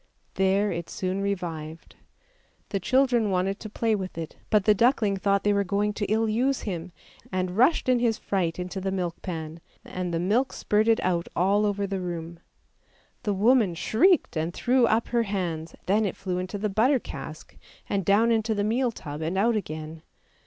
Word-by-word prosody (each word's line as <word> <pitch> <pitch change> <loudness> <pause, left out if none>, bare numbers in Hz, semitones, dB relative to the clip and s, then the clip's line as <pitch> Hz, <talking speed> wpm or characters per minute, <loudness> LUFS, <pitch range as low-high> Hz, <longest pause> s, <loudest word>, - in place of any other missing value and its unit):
There 195 +2 +2
it 170 -1 -4
soon 185 +1 -2
revived. 165 -5 -4 0.7
The 195 - -1
children 245 0 +2
wanted 190 +1 0
to 215 - -7
play 225 +1 0
with 190 -4 -3
it, 165 -1 -6
but 210 -2 +3
the 210 - +6
duckling 220 -2 +2
thought 200 +1 +1
they 205 - +3
were 200 0 +2
going 205 +2 0
to 205 -1 -3
ill 220 +1 +2
use 250 +5 +1
him, 180 -3 -5 0.4
and 185 -1 -2
rushed 255 +9 +3
in 255 -1 +4
his 230 -2 +1
fright 180 -4 -1
into 180 +2 -4
the 195 - -1
milk 180 -3 -3
pan, 160 -2 -5 0.3
and 180 -1 -4
the 165 - -1
milk 220 +9 +1
spurted 220 +2 +2
out 175 -2 0
all 200 +4 +3
over 200 0 -1
the 195 -1 -3
room. 170 -1 -5 0.8
The 205 - -1
woman 215 -3 +3
shrieked 295 - +3
and 160 +2 -2
threw 250 -1 +3
up 225 +1 +1
her 240 -1 +2
hands, 175 -6 -3
then 210 +3 +2
it - - -5
flew 180 -2 -3
into 185 +3 -4
the 210 +2 -1
butter 225 +8 +3
cask, - - -9 0.3
and 195 -1 -1
down 210 +5 +4
into 220 -1 +1
the 205 - 0
meal 240 +4 +1
tub 150 -7 -7
and 165 +4 -2
out 225 +4 +3
again. 155 -5 -5
200 Hz, 190 wpm, -26 LUFS, 180-220 Hz, 0.8 s, the